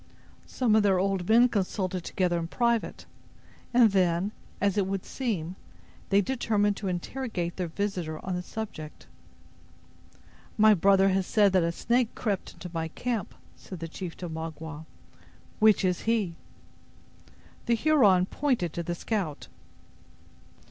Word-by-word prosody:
Some 235 Hz, -5 st, +1 dB
of 220 Hz, -, +5 dB
their 195 Hz, -2 st, +3 dB
old 190 Hz, -1 st, -1 dB
men 235 Hz, +3 st, +7 dB
consulted 190 Hz, -4 st, -2 dB
together 175 Hz, -1 st, 0 dB
in 165 Hz, -, -4 dB
private, 235 Hz, +4 st, -1 dB, 0.7 s
and 235 Hz, -3 st, +5 dB
then, 185 Hz, 0 st, +1 dB, 0.3 s
as 200 Hz, -2 st, +1 dB
it 200 Hz, -3 st, +1 dB
would 195 Hz, -1 st, -3 dB
seem, 190 Hz, -10 st, -3 dB, 0.5 s
they 200 Hz, 0 st, +4 dB
determined 205 Hz, -3 st, 0 dB
to 200 Hz, -, -4 dB
interrogate 180 Hz, -1 st, -3 dB
their 180 Hz, -2 st, -2 dB
visitor 175 Hz, -3 st, -3 dB
on 185 Hz, -, -2 dB
the 180 Hz, -, -2 dB
subject. 180 Hz, -6 st, -7 dB, 1.5 s
"My 215 Hz, 0 st, +7 dB
brother 195 Hz, +1 st, +4 dB
has 190 Hz, -1 st, 0 dB
said 205 Hz, -3 st, +3 dB
that 185 Hz, -, +4 dB
a 170 Hz, 0 st, +1 dB
snake 235 Hz, +6 st, 0 dB
crept 205 Hz, -5 st, -2 dB
into 170 Hz, +1 st, -9 dB
my 165 Hz, -1 st, -2 dB
camp," 225 Hz, +4 st, -4 dB, 0.2 s
said 185 Hz, -, -10 dB
the 165 Hz, -, -5 dB
chief 170 Hz, +1 st, -7 dB
to 180 Hz, -, -5 dB
Magua; 160 Hz, -1 st, -7 dB, 0.7 s
"which 215 Hz, -3 st, +5 dB
is 180 Hz, -1 st, 0 dB
he?" 220 Hz, -6 st, 0 dB, 1.3 s
The 235 Hz, -, +4 dB
Huron 220 Hz, -10 st, +4 dB
pointed 230 Hz, -, -1 dB
to 170 Hz, -, -3 dB
the 175 Hz, +1 st, -3 dB
scout. 180 Hz, -6 st, -3 dB
195 Hz, 140 wpm, -28 LUFS, 175-220 Hz, 1.5 s, men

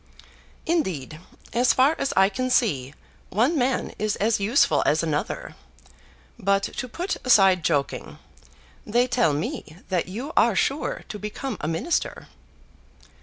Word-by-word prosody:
"Indeed, 170 Hz, -, -1 dB, 0.3 s
as 245 Hz, +2 st, +3 dB
far 265 Hz, +4 st, +4 dB
as 275 Hz, -, 0 dB
I 190 Hz, 0 st, +6 dB
can 255 Hz, +5 st, -2 dB
see, 150 Hz, -, +1 dB, 0.3 s
one 240 Hz, -, +2 dB
man 260 Hz, -2 st, 0 dB
is 215 Hz, -1 st, 0 dB
as 215 Hz, +1 st, +1 dB
useful 215 Hz, +7 st, +3 dB
as -, -, +2 dB
another. -, -, -3 dB, 0.8 s
But 200 Hz, -1 st, +2 dB
to 255 Hz, -, -4 dB
put 355 Hz, +10 st, -3 dB
aside 195 Hz, -8 st, +5 dB
joking, 145 Hz, -4 st, -1 dB, 0.7 s
they 240 Hz, +3 st, +2 dB
tell 245 Hz, -10 st, +2 dB
me 165 Hz, -, -4 dB
that 180 Hz, -3 st, 0 dB
you 240 Hz, -, -6 dB
are 230 Hz, -2 st, +4 dB
sure 275 Hz, +9 st, -1 dB
to 210 Hz, -, -7 dB
become 210 Hz, +6 st, -5 dB
a 150 Hz, -, -2 dB
minister." 165 Hz, -, -2 dB
215 Hz, 135 wpm, -24 LUFS, 185-255 Hz, 0.8 s, I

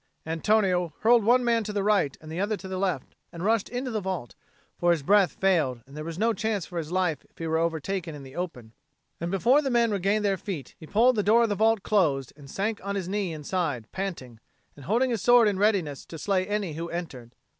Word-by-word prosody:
Antonio 180 Hz, 0 st, +1 dB
hurled 230 Hz, 0 st, +5 dB
one 245 Hz, +4 st, +4 dB
man 230 Hz, -1 st, +2 dB
to 210 Hz, -, -4 dB
the 205 Hz, -1 st, -1 dB
right 200 Hz, -9 st, +2 dB
and 155 Hz, 0 st, -11 dB
the 165 Hz, -, -4 dB
other 205 Hz, +2 st, 0 dB
to 190 Hz, -, -9 dB
the 190 Hz, -1 st, -4 dB
left, 185 Hz, -9 st, -2 dB, 0.2 s
and 170 Hz, +2 st, -6 dB
rushed 220 Hz, -1 st, +1 dB
into 250 Hz, +1 st, -3 dB
the 215 Hz, -2 st, -2 dB
vault; 185 Hz, -, -4 dB, 0.5 s
for 175 Hz, -, +2 dB
his 165 Hz, -4 st, +2 dB
breath 195 Hz, 0 st, +4 dB
failed, 155 Hz, -11 st, +1 dB
and 135 Hz, +2 st, -15 dB
there 155 Hz, -, -5 dB
was 165 Hz, +1 st, -6 dB
no 225 Hz, +3 st, +2 dB
chance 215 Hz, -3 st, -2 dB
for 175 Hz, -2 st, -5 dB
his 160 Hz, 0 st, -6 dB
life 180 Hz, -5 st, 0 dB, 0.2 s
were 160 Hz, -1 st, 0 dB
he -, -, +1 dB
overtaken 165 Hz, +1 st, -2 dB
in 145 Hz, -, -9 dB
the 135 Hz, 0 st, -12 dB
open; 125 Hz, -11 st, -6 dB, 0.5 s
and 170 Hz, -, -3 dB
before 235 Hz, +10 st, +3 dB
the 275 Hz, -, -2 dB
men 235 Hz, -2 st, +2 dB
regained 205 Hz, +2 st, +1 dB
their 195 Hz, -1 st, +1 dB
feet, 170 Hz, -, -6 dB
he 160 Hz, -, -11 dB
pulled 240 Hz, +7 st, +4 dB
the 210 Hz, -, +2 dB
door 225 Hz, +4 st, +4 dB
of 230 Hz, -, +1 dB
the -, -, +1 dB
vault 220 Hz, 0 st, +2 dB
close 145 Hz, -, +1 dB
and 140 Hz, -1 st, -15 dB
sank 205 Hz, +7 st, -2 dB
on 200 Hz, 0 st, -3 dB
his 190 Hz, -3 st, -3 dB
knee 195 Hz, -2 st, -1 dB
inside, 150 Hz, -, -2 dB
panting, 165 Hz, -, -5 dB, 0.4 s
and 145 Hz, -, -13 dB
holding 245 Hz, +6 st, +2 dB
his 225 Hz, -5 st, -1 dB
sword 240 Hz, +1 st, +6 dB
in 200 Hz, -2 st, 0 dB
readiness 190 Hz, -9 st, +1 dB
to 165 Hz, -, -10 dB
slay 185 Hz, +3 st, 0 dB
any 205 Hz, -5 st, -2 dB
who 165 Hz, +2 st, -5 dB
entered. 130 Hz, -9 st, -7 dB
190 Hz, 235 wpm, -26 LUFS, 160-210 Hz, 0.5 s, sword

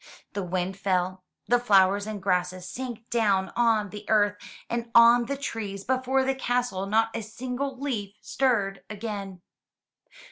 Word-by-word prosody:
The 200 Hz, -, -2 dB
wind 185 Hz, +1 st, -2 dB
fell, 185 Hz, -1 st, -1 dB, 0.2 s
the 245 Hz, 0 st, +4 dB
flowers 200 Hz, -3 st, +4 dB
and 215 Hz, -1 st, -4 dB
grasses 180 Hz, -1 st, 0 dB
sank 240 Hz, 0 st, -6 dB
down 200 Hz, -5 st, +2 dB
on 225 Hz, -4 st, +2 dB
the 210 Hz, 0 st, -8 dB
earth 205 Hz, -1 st, +3 dB, 0.3 s
and 235 Hz, 0 st, -3 dB
on 235 Hz, 0 st, +7 dB
the 280 Hz, -, -2 dB
trees 210 Hz, -7 st, -5 dB
before 260 Hz, +2 st, +1 dB
the 270 Hz, 0 st, +1 dB
castle 245 Hz, -7 st, -1 dB
not 225 Hz, +2 st, +2 dB
a 230 Hz, -, -2 dB
single 250 Hz, +5 st, -4 dB
leaf 215 Hz, -8 st, -3 dB
stirred 210 Hz, -8 st, 0 dB
again. 200 Hz, -4 st, -6 dB
215 Hz, 145 wpm, -26 LUFS, 195-245 Hz, 0.3 s, on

